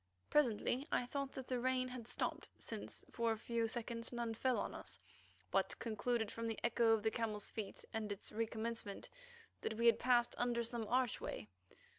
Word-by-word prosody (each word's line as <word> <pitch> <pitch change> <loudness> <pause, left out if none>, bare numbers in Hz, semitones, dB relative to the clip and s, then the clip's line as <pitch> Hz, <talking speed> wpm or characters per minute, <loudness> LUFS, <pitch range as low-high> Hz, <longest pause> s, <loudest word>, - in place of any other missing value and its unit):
Presently 260 0 +3
I 245 - +3
thought 275 +2 -2
that 260 -1 -5
the 250 -1 0
rain 255 +1 +2
had 250 -2 -6
stopped, - - -1
since - - -5
for 230 -1 +2
a 220 - 0
few 230 +1 0
seconds 230 0 -3
none 235 -2 -1
fell 255 +2 +2
on - - -1
us, - - -6 0.5
but - - +2
concluded 230 -1 0
from 230 0 -2
the 225 - -1
echo 235 -1 +5
of 220 -2 +2
the 220 - +3
camels' 215 -3 -1
feet 215 -3 -5
and 215 -2 -1
its 200 - -5
recommencement 225 -1 -2 0.5
that 220 - -1
we 230 +2 +1
had 235 - +7
passed 240 -1 +4
under 240 -1 +2
some 230 -1 -3
archway. 245 - +1
235 Hz, 180 wpm, -39 LUFS, 225-245 Hz, 0.5 s, had